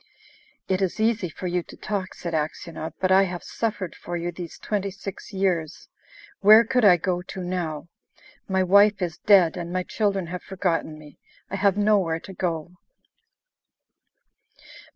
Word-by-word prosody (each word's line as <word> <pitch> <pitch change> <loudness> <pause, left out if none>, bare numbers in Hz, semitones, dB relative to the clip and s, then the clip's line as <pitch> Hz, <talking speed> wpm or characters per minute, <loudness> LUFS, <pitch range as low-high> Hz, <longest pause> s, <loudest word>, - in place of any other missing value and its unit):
"It 190 0 0
is 190 +2 -1
easy 220 -4 +1
for 185 - -9
you 180 0 0
to - - -14
talk," 195 -3 -4
said 170 -1 -6
Aksionov, 160 +1 -3
"but 185 0 +1
I 190 +1 +7
have 175 -2 -6
suffered 205 -6 -3
for 175 - -5
you 175 +1 -3
these 175 -1 -8
twenty 200 -2 -2
six 195 +2 -8
years. 180 -5 -1 0.5
Where 215 +3 +8
could 250 +1 +1
I 185 -4 +7
go 180 +1 -1
to 185 0 -7
now?... 175 -3 -3 0.6
My 190 -1 +1
wife 200 +2 +5
is 170 -1 -4
dead, 185 -5 +5
and 170 -1 -5
my 185 0 -1
children 195 -2 -1
have 180 - -4
forgotten 170 -4 -2
me. 150 -2 -15 0.3
I - - -2
have 200 0 +2
nowhere 200 -6 +2
to 190 - -11
go..." 170 -3 -3
185 Hz, 160 wpm, -24 LUFS, 170-200 Hz, 0.6 s, Where